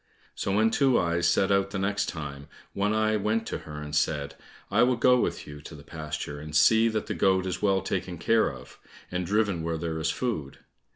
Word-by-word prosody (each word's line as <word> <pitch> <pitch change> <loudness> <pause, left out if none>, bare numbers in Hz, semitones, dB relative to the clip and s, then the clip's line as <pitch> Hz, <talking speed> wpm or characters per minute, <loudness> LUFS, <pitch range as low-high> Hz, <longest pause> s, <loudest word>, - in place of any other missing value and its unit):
So 95 - -2
when 110 +2 +3
Two 135 0 +3
eyes 85 0 +1
set 95 +3 +2
out 100 0 +2
the 100 - -4
next 100 +1 0
time, 70 -3 -7 0.3
One 100 +1 0
eye 110 0 +2
went 110 +2 0
to - - -3
her 75 -1 -8
and 75 0 -5
said, 70 -2 0 0.4
"I 105 +4 +3
will 125 +1 +4
go 125 +1 +4
with - - -2
you 75 0 -10
to 75 - -10
the 70 - -12
pasture, 75 -2 -6
and 75 +1 -8
see 110 +9 +5
that 110 -2 -1
the 105 - -3
goat 95 +1 +2
is 95 - -3
well 95 -2 +2
taken 90 -2 -3
care 115 +7 +2
of, - - -13 0.3
and 90 -1 -2
driven 100 -3 +1
where 80 0 -2
there 80 0 -3
is 80 0 0
food." 90 - -3
95 Hz, 220 wpm, -27 LUFS, 80-110 Hz, 0.4 s, see